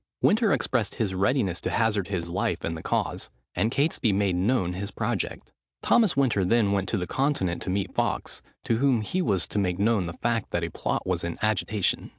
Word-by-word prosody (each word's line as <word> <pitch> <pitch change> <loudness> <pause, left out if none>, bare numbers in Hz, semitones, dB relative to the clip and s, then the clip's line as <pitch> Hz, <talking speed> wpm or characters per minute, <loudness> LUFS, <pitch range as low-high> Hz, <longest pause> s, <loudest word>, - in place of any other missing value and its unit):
Winter 220 -1 +4
expressed 115 -6 0
his 105 -5 -1
readiness 95 -2 +1
to - - -2
hazard 105 -4 +1
his 90 -4 -3
life 85 +2 -1
in 80 - -2
the 80 - -6
cause; - - -2 0.2
and 100 +6 +1
Catesby 140 -4 +1
made 100 -2 +1
known 95 -1 +1
his 100 +2 -4
project. 100 - -3 0.3
Thomas 220 - +3
Winter 120 -8 +3
then 105 +2 +3
went 95 -1 0
to 110 - 0
the 90 - -2
Continent 95 - 0
to - - -4
meet 95 0 -1
Fawkes, - - -2 0.2
to 115 - +1
whom 130 -2 +3
he 180 - -1
was 100 - +1
to 105 - -2
make 90 -3 0
known 100 -3 +2
the 85 - -5
fact, 115 +3 -1
that 85 - -1
a 85 - -3
plot - - -2
was 90 -2 0
in 85 -1 -3
agitation. 105 -2 0
100 Hz, 205 wpm, -26 LUFS, 90-115 Hz, 0.3 s, Winter